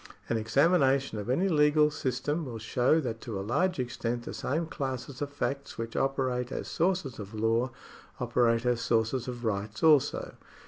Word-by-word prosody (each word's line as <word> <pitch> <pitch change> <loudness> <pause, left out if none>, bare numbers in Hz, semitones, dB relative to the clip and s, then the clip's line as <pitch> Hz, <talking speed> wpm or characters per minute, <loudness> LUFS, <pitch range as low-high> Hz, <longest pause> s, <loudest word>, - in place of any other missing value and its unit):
An 115 - +1
examination 135 +1 +2
of 105 - -5
any 170 +10 +2
legal 150 -2 +4
system 145 +4 -2
will 125 -5 -6
show 125 +7 +2
that 115 -5 -4
to 110 -5 -5
a 95 - -4
large 180 - +1
extent 120 -1 -2
the - - -6
same 160 +5 -1
classes 135 -3 -5
of 145 - -1
facts 140 -1 -3
which 115 0 -5
operate 130 -2 0
as - - -4
sources 170 -8 0
of 105 +1 -8
law 115 +3 +1 0.5
operate 120 -1 +2
as 120 -1 +1
sources 115 +2 +1
of 120 -1 -5
rights 105 0 -2
also. 150 -4 +3
125 Hz, 170 wpm, -29 LUFS, 115-145 Hz, 0.5 s, legal